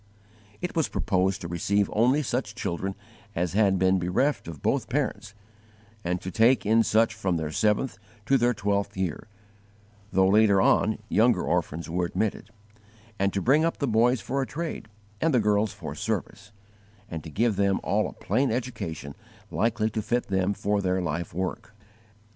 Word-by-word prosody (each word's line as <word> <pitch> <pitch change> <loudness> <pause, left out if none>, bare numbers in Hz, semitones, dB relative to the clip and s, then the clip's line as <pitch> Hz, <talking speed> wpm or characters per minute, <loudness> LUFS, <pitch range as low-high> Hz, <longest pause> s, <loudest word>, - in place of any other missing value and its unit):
It 180 - -4
was 160 -3 +2
proposed 95 -1 0
to 85 - -5
receive 100 +4 +1
only 125 +7 +3
such 120 -4 -2
children 95 -3 -3 0.4
as 90 0 -1
had 100 -2 +3
been 95 +1 +3
bereft 90 - 0
of 80 -4 -9
both 130 -5 0
parents, 110 -6 -2 0.7
and 90 +1 -1
to 95 - -5
take 115 +5 +3
in 110 +2 +4
such 115 +1 +3
from 95 -6 -1
their 80 -1 -3
seventh 105 - 0 0.3
to 135 - +3
their 120 0 +2
twelfth 100 0 -1
year, 95 -1 -3 0.8
though 95 0 +4
later 100 0 +5
on 105 +2 +3
younger 115 +2 +3
orphans 85 -1 -1
were 85 +1 -1
admitted; 110 +4 -2 0.7
and 100 0 +2
to 100 - -1
bring 145 +5 +4
up 165 - 0
the 140 - -1
boys 120 +1 +3
for 135 +7 -2
a 135 - -2
trade, 165 -7 -5 0.3
and 160 -4 +2
the - - +5
girls 105 -1 +2
for - - -7
service, 105 +1 -4 0.6
and 80 -2 -6
to 80 - -8
give 110 +6 +1
them 100 0 +2
all - - +1
a - - -12
plain 135 0 0
education 105 - -4 0.4
likely 110 -1 0
to 110 - -2
fit 120 +2 -1
them 95 +1 +1
for 100 0 0
their 95 -1 0
life 85 -1 -3
work. 95 +5 -4
105 Hz, 170 wpm, -26 LUFS, 95-120 Hz, 0.8 s, later